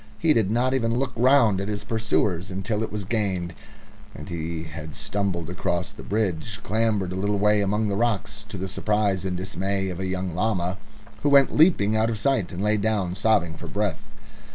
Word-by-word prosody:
He 160 -2 +3
did 110 -7 +2
not 125 +4 +1
even 115 -3 +1
look 130 0 -1
round 120 -5 +4
at 100 - -3
his 105 -1 -3
pursuers 105 -5 0
until 95 +3 -2
it 110 - -3
was 105 -2 -4
gained, 95 -5 -1 0.6
and - - -9
he 85 -1 -4
had 80 -1 -8
stumbled 95 -5 -2
across 90 0 -2
the - - -11
bridge, 100 -1 -2
clambered 105 -4 0
a - - -3
little 100 +2 0
way 105 +1 +3
among 105 +2 +1
the 100 - -1
rocks, 110 -2 -1
to 100 - -6
the 95 +1 -3
surprise 100 -1 0
and 90 -1 -2
dismay 95 +1 -2
of 90 -1 -5
a 95 - -2
young 95 -1 -2
llama, 95 -1 -1 0.4
who 145 - +2
went 140 -1 +5
leaping 150 - +4
out 110 +1 +2
of 115 - -2
sight, 120 -6 +1
and 90 +3 -4
lay 105 0 +3
down 100 -4 0
sobbing 95 -5 +2
for - - -8
breath. 100 -4 -1
100 Hz, 200 wpm, -25 LUFS, 90-110 Hz, 0.6 s, went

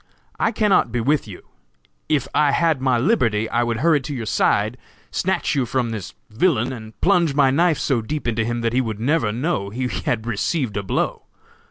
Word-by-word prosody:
I 225 - +2
cannot 210 - +2
be 120 - -1
with 140 +2 +1
you. 95 -4 -10 0.7
If 145 -3 +1
I 145 -2 +3
had 165 -5 +2
my 130 -2 +2
liberty 115 - +1
I 120 - +2
would 120 -1 -1
hurry 160 -2 +3
to 140 +2 -5
your 115 -3 -4
side, 110 +2 +1 0.3
snatch 190 +1 0
you 135 -4 0
from 120 -1 -1
this 105 -5 -6 0.2
villain, 125 0 +1
and 110 -2 -10
plunge 175 -6 +3
my 140 -2 +4
knife 165 +2 +3
so 130 -5 0
deep 145 +4 -4
into 115 -1 0
him 120 +1 -2
that 115 0 -1
he 130 - +3
would 110 -4 -4
never 125 -2 +1
know 120 - -2
he 125 +5 -3
had 115 -3 -2
received 120 +2 -1
a 100 - -1
blow!!! 95 - -2
125 Hz, 200 wpm, -21 LUFS, 115-150 Hz, 0.7 s, my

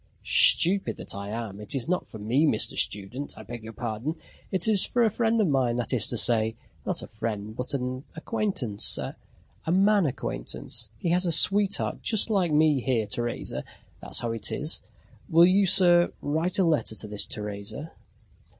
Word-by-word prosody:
"Stupid 190 +3 +5
that - - -4
I 100 0 -7
am! 110 -2 -6
It 105 +5 -4
is 130 -3 -2
not 180 0 -1
for - - -10
me, 120 +9 +1
Mr. 110 - +2
Student, 105 +8 -3
I - - -9
beg 120 -2 -9
your 110 - -8
pardon. 115 +7 -4 0.4
It 190 -1 +1
is 210 -3 +3
for 245 - +1
a 220 - +2
friend 225 +1 0
of 215 - +3
mine, 130 -5 +1
that 120 +1 -3
is 125 - +3
to 120 - -4
say, 110 -1 +2 0.3
not - - -2
a - - -8
friend 110 -1 -5
but 125 +3 -4
an 130 0 -4
acquaintance 160 - -1
a 160 - -9
man 195 0 +3
acquaintance. 110 - -3
He 170 - -3
has 180 +1 +2
a - - +1
sweetheart 200 +4 +2
just 220 0 0
like 185 -6 +1
me 150 -2 +3
here, 120 -4 0
Teresa. 120 +3 -4 0.4
That's - - 0
how 120 - -2
it 115 -2 -3
is. - - 0 0.5
Will 165 +2 +6
you, 190 +2 +3
sir, 175 -2 +5
write 160 +5 0
a 195 - +3
letter 155 -9 0
to 110 - -5
this 105 -1 +3
Teresa?" 105 +8 -6
135 Hz, 185 wpm, -26 LUFS, 110-180 Hz, 0.5 s, Will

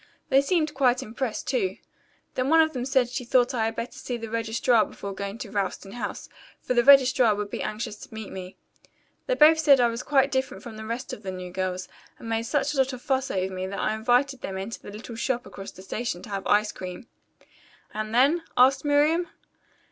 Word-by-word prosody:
"They 270 - +5
seemed 310 +1 0
quite 255 -3 +2
impressed, 230 +1 -4
too. 235 -8 -1 0.6
Then 255 +1 -1
one 325 +1 +6
of 315 0 +4
them 250 -2 -3
said 260 -2 +2
she 250 +1 -4
thought 245 +1 +2
I 225 -3 +1
had 225 0 -2
better 230 - -4
see 245 - -4
the 225 -1 -7
registrar 230 0 +2
before 200 0 -7
going 200 +2 -5
to 230 -5 -7
Ralston 195 -1 -3
House, 245 - -5 0.3
for - - -2
the 240 -1 +3
registrar 260 -4 +6
would 205 0 -4
be - - -4
anxious 215 0 -4
to - - -13
meet 220 -2 -7
me. 185 -1 -8 0.7
They - - +1
both 320 -5 +6
said 285 -4 +6
I 240 -1 +4
was 230 +1 -4
quite 275 -1 +2
different 260 -7 -2
from 230 -2 -9
the 220 0 -8
rest 235 +4 -4
of - - -7
the 195 - -6
new 185 -1 -6
girls, 185 0 -3 0.3
and - - -10
made 225 0 -1
such 290 +2 0
a - - -4
lot 265 0 +2
of 250 - -7
fuss 265 0 0
over 190 0 -2
me 185 0 -3
that 200 - -5
I 215 - 0
invited 250 +4 +1
them 190 - -5
into 195 +4 -5
that - - -10
little 225 +2 -8
shop 245 +2 -1
across 195 0 -9
from - - -15
the - - -11
station 215 -3 -4
to - - -10
have 195 -1 -4
ice 210 +1 +3
cream." 180 +4 -8 0.9
"And 215 0 -4
then?" 275 +9 +4 0.2
asked 260 +2 +5
Miriam. 300 +4 +3
235 Hz, 225 wpm, -26 LUFS, 210-265 Hz, 0.9 s, one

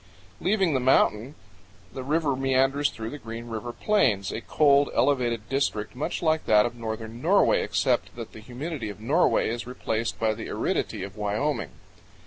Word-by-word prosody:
Leaving 190 -4 +2
the 130 - +2
mountain, 125 0 +2 0.6
the 130 - -5
river 145 +1 0
meanders 135 +2 +2
through 110 0 -7
the 145 - -7
Green 115 -1 -7
River 115 +1 -4
Plains, 120 - +1
a 110 - -4
cold 140 +3 +3
elevated 120 -6 +1
district 125 -6 -1
much 145 +6 -3
like 160 -1 +1
that 105 +1 +5
of 120 - -3
northern 115 0 -6
Norway, - - +4
except - - 0
that - - -7
the - - -10
humidity 125 +2 -5
of 105 - -9
Norway 145 +11 +2
is 120 +1 -4
replaced 115 -2 -3
by 110 -1 +2
the 110 +1 -7
aridity - - -2
of 100 +1 -8
Wyoming. 105 +9 -1
120 Hz, 165 wpm, -26 LUFS, 110-140 Hz, 0.6 s, that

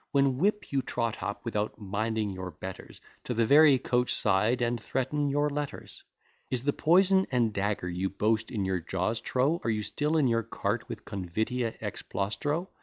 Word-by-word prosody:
When 135 -2 +2
whip 210 +4 +1
you 140 -1 +2
trot 115 -3 -2
up, 100 +5 -4
without 105 -2 -2
minding 110 +1 -1
your 95 -1 -5
betters, 95 +3 -9 0.2
To 125 - -2
the 115 0 +3
very 145 +2 +7
coach 125 0 0
side, 105 +4 +2
and 120 -1 0
threaten 140 +5 -1
your 145 +1 +2
letters. 145 -1 -5 0.5
Is 130 -2 -1
the 145 +1 +1
poison 190 +3 +4
[and 120 -4 +2
dagger] 100 -2 -1
you 90 +2 -1
boast 110 +3 0
in 105 -5 -2
your 95 -1 0
jaws, 95 +6 -2
trow? 140 +9 +1
Are - - 0
you 105 -1 0
still 150 +8 0
in 145 -4 +4
your 115 -1 +2
cart - - -3
with - - -7
convitia 110 +6 -2
ex - - -4
plaustro? 130 - -2
115 Hz, 180 wpm, -29 LUFS, 100-140 Hz, 0.5 s, very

